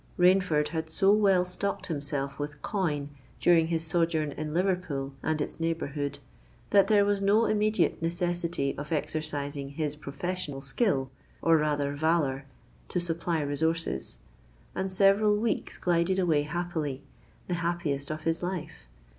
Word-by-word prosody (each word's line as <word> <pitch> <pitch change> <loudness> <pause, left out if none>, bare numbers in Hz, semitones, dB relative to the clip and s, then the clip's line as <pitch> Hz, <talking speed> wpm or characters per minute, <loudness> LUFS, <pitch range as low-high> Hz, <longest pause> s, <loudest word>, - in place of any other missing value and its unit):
Rainford 180 -5 +4
had 160 -1 -3
so 195 +5 +4
well 195 -4 +4
stocked 200 +2 -2
himself 140 -3 -3
with 145 0 -5
coin 155 -8 -1 0.3
during 165 -2 +4
his 165 -1 -1
sojourn 160 -2 +1
in 155 +1 -5
Liverpool 170 -6 -1
and 155 -1 0
its 145 - -3
neighbourhood, 145 -4 -2 0.5
that 200 -1 +6
there 205 -2 +5
was 205 -1 +1
no 205 +3 +4
immediate 215 -3 +1
necessity 170 -3 -1
of 145 +2 -7
exercising 145 -3 -2
his 150 0 -3
professional 150 +1 -4
skill, 135 - 0 0.3
or 165 0 +4
rather 145 -2 0
valour, 145 -3 +1 0.4
to 180 - 0
supply 165 -1 -1
resources; 150 - -1 0.6
and 190 0 -2
several 200 +2 +4
weeks 225 +1 -1
glided 175 +1 +1
away 165 -6 +3
happily—the 160 0 -5
happiest 170 -5 -1
of 155 0 -4
his 165 0 0
life! 175 - -5
165 Hz, 135 wpm, -28 LUFS, 145-180 Hz, 0.6 s, that